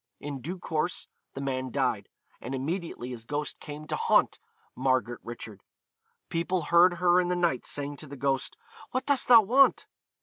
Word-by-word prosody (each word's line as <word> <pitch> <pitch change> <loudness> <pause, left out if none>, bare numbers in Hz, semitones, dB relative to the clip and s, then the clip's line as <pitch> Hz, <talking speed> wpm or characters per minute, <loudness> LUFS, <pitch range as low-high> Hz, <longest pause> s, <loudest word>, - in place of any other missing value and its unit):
In 140 -2 -6
due 175 +8 -5
course 170 0 -2 0.3
the 135 - -5
man 130 -1 -2
died, - - -1 0.3
and 130 +3 -4
immediately 150 -2 -4
his 120 -3 -7
ghost 145 +3 -3
came 150 +1 -8
to - - -3
haunt - - +2 0.4
Margaret 125 -2 0
Richard. 110 -4 -9 0.7
People 170 +2 -1
heard 175 +3 +5
her 175 +1 +4
in 175 - -2
the 180 - 0
night 170 -8 0
saying 145 0 -4
to 155 - -9
the 140 +1 -9
ghost, 135 0 -1 0.3
'What 255 - -2
dost 285 -2 +1
thou 235 -2 +9
want?' 265 +7 +4
150 Hz, 170 wpm, -28 LUFS, 130-175 Hz, 0.7 s, thou